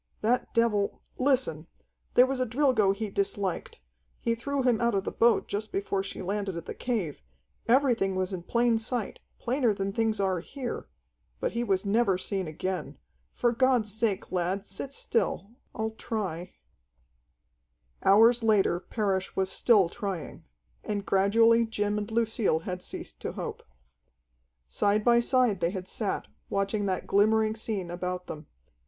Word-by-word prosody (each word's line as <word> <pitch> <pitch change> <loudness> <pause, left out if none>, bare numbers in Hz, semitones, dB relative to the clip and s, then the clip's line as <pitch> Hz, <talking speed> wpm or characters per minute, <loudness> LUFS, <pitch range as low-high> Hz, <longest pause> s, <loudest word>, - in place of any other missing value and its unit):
"That 240 +3 +1
devil 215 -4 +1 0.2
Listen: 255 - +1 0.5
there 250 - +8
was 265 0 -2
a 255 - +2
Drilgo 235 -5 +3
he 205 +1 -3
disliked. 195 - -2 0.4
He 230 - 0
threw 275 +4 -2
him 245 -3 +2
out 235 -2 +2
of 195 - +1
the - - -3
boat 235 0 +3
just 210 +2 -4
before 195 0 -1
she 195 - -6
landed 195 -1 -2
at 170 - -6
the - - -5
cave. 210 - -3 0.5
Everything 235 -6 +3
was 185 +1 -1
in 180 - -4
plain 235 +4 +2
sight, 225 -1 -3 0.2
plainer 245 -3 +1
than 195 0 -2
things 220 -1 0
are 190 -2 +1
here. 250 - -6 0.5
But - - -1
he 235 +1 -1
was 195 -3 0
never 200 -2 +2
seen 190 -1 -3
again. 185 +4 -4 0.4
For 240 - +2
God's 245 -4 +2
sake, 220 -3 -1
lad, 185 +2 -1
sit 205 +8 -4
still. 215 -6 -1 0.2
I'll 220 -1 -2
try 190 -6 -4 0.7
" - - -33
Hours 225 +5 +6
later 210 -6 +3
Parrish 190 -2 -2
was 190 0 0
still 210 -7 +4
trying. 195 -3 -5 0.4
And 205 -1 -3
gradually 225 +4 +4
Jim 210 -1 -1
and 205 +1 -5
Lucille 225 -7 +1
had 180 +1 -5
ceased - - -7
to - - -4
hope. - - -5 1.1
Side 205 - +1
by 235 -1 +6
side 240 -5 +2
they 170 -1 +1
had 185 -1 -5
sat, 205 -1 -2 0.2
watching 200 +1 0
that 185 -1 -2
glimmering 215 +2 +3
scene 210 -6 -3
about 180 +1 -4
them. 155 -2 -8
205 Hz, 155 wpm, -28 LUFS, 190-230 Hz, 1.1 s, there